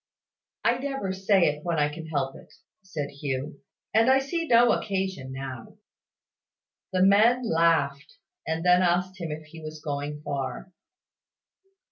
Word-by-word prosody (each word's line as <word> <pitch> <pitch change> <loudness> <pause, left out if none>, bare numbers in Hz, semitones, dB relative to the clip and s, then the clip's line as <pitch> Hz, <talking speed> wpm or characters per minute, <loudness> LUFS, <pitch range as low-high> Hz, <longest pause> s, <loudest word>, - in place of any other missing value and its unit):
"I 240 +1 +3
never 270 -8 -3
say 190 0 +2
it 150 -1 +1
when 170 -2 -1
I 150 -1 +3
can 160 +1 -8
help 140 -4 -2
it," - - -15 0.3
said 160 -7 -5
Hugh; 140 0 -4 0.3
"and 225 +3 +4
I 265 - +6
see 325 +5 -2
no 240 -1 +6
occasion 190 -9 -2
now." 130 -3 -7 1.1
The 185 -1 +2
men 220 +6 +5
laughed, 160 -5 +1 0.3
and 160 +1 -2
then 180 0 +6
asked 180 +1 0
him 165 - -3
if 155 +1 -6
he 160 +2 -12
was 155 0 -8
going 150 0 -4
far. 140 +4 -4
165 Hz, 145 wpm, -26 LUFS, 145-195 Hz, 1.1 s, I